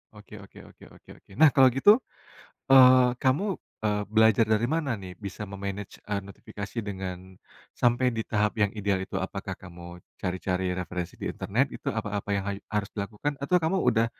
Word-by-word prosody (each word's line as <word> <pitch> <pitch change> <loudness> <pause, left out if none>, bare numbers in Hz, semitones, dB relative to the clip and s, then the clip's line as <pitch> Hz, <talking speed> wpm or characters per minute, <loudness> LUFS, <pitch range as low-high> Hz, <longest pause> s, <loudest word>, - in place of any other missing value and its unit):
Oke 105 0 -13
oke 100 - -15
oke - - -18
oke - - -22
oke. - - -24
Nah, 160 -1 +8
kalau 130 -2 +7
gitu, 135 +11 +6 0.8
eee, 130 -1 +8
kamu, 135 +8 +2 0.4
eee, 105 -1 +1
belajar 110 0 +5
dari 110 +1 +2
mana 160 -4 -1
nih, 95 -3 -9
bisa 100 +1 -5
me 100 -1 -8
manage, 100 0 -6
eee, 100 -1 -1
notifikasi 100 +2 -9
dengan, 95 -1 -6 0.4
sampai 120 +1 +3
di 110 - -2
tahap 105 0 0
yang 105 -2 +1
ideal 100 -3 -1
itu? 95 - -6
Apakah 95 +1 -5
kamu 85 -1 -11 0.2
cari-cari 90 0 -2
referensi 90 -1 -5
di - - -3
internet, - - -1
itu - - -5
apa - - -3 0.2
apa - - -6
yang 100 -1 -1
hayu 100 0 -4
harus 105 -1 -1
dilakukan? 105 +8 -3
Atau 160 +7 +1
kamu 170 +4 0
udah, 115 -2 +3
105 Hz, 180 wpm, -27 LUFS, 95-125 Hz, 0.8 s, Nah